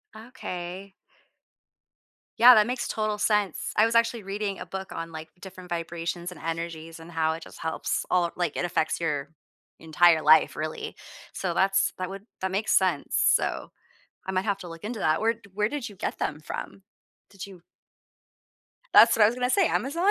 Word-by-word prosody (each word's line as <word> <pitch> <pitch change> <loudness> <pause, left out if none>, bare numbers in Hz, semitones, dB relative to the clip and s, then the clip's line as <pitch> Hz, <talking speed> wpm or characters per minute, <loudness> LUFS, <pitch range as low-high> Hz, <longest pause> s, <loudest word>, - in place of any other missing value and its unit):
Okay. 195 -5 -7 1.5
Yeah, 245 +2 +10
that 215 0 +5
makes 250 0 -2
total 215 -1 -1
sense, 210 -4 0
I 215 - +5
was 230 +1 -1
actually 230 -1 +2
reading 200 0 -4
a - - -6
book 190 +2 -7
on, 165 0 -6
like, 160 0 -8
different 185 -2 -11
vibrations 170 +1 -4
and - - -11
energies 165 0 -5
and 165 +1 -12
how 160 -1 +1
it 160 - -7
just - - -12
helps 160 0 -2
all 175 -2 +2
like, 175 -4 -2
it - - -2
affects 175 -2 0
your 145 -4 -2 0.5
entire 160 0 +4
life, 155 +1 +5
really, 155 0 -5 0.4
so 180 -3 -2
that's 195 0 +2
that 185 0 -4
would 195 +1 -9 0.2
that 190 - -1
makes 200 +3 0
sense. 185 -6 +1
So, - - +1 0.5
I 190 - -3
might 185 +2 -1
have 200 -2 0
to 180 - -9
look 165 0 -10
into 220 +1 -5
that. 155 +4 +1
Where 225 +1 +3
di 225 -3 -19
where 210 +2 0
did 290 -3 -4
you 205 - -13
get - - -4
them 150 - -2
from? 185 +5 -7 0.5
Did 195 0 -9
you 190 -3 -13 1.3
That's 230 - +8
what 215 - +5
I - - +7
was 230 - -1
gonna 250 0 -1
say, 370 +5 +3
Amazon? 335 +9 0
185 Hz, 190 wpm, -26 LUFS, 165-215 Hz, 1.5 s, Yeah